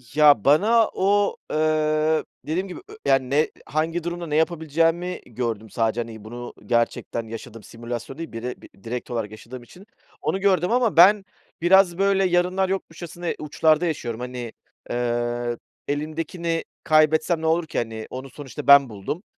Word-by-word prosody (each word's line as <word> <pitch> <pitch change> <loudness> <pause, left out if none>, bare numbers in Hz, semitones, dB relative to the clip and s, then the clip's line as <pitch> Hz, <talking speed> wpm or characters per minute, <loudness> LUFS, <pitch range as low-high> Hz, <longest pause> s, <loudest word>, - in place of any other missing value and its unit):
Ya, 145 -8 +6
bana 215 +11 +5
o, 200 +1 +2
eee, 155 0 +1 0.2
dediğim 175 +6 -2
gibi 185 - -8
ö 420 - -12
yani, 130 -1 +2
ne 150 +3 +2 0.2
hangi 165 +2 -1
durumda 175 0 -4
ne 150 - -2
yapabileceğimi 165 +2 +1
gördüm 115 -2 -4
sadece, 115 +2 0
hani, 110 -2 -8
bunu 120 +3 -8
gerçekten 115 -1 -1
yaşadığım 115 0 -9
simülasyon 120 +3 -7
değil 165 0 -6
bire 120 +2 -6
b - - -12 0.2
direkt 125 +2 -5
olarak 115 -4 -3
yaşadığım 120 +3 -10
için 180 +11 -16 0.4
onu 190 - -1
gördüm 190 -1 +2
ama 240 -5 +2
ben 195 +3 +7 0.4
biraz, 180 0 +5
böyle, 195 0 +3
yarınlar 180 +1 +1
yokmuşçasına 175 -2 -5
uçlarda 155 +2 +2
yaşıyorum. 120 -8 -3
Hani, 125 -2 -6 0.4
eee, 120 0 -1 0.3
elimdekini 165 +3 -2 0.2
kaybetsem 155 +2 +3
ne 160 - -3
olur 165 +1 +2
ki? - - -6
Hani, 110 -1 -3
onu 130 +1 -7
sonuçta 145 +2 -9
ben 140 -2 +8
buldum. 110 - -5
155 Hz, 150 wpm, -23 LUFS, 120-175 Hz, 0.4 s, ben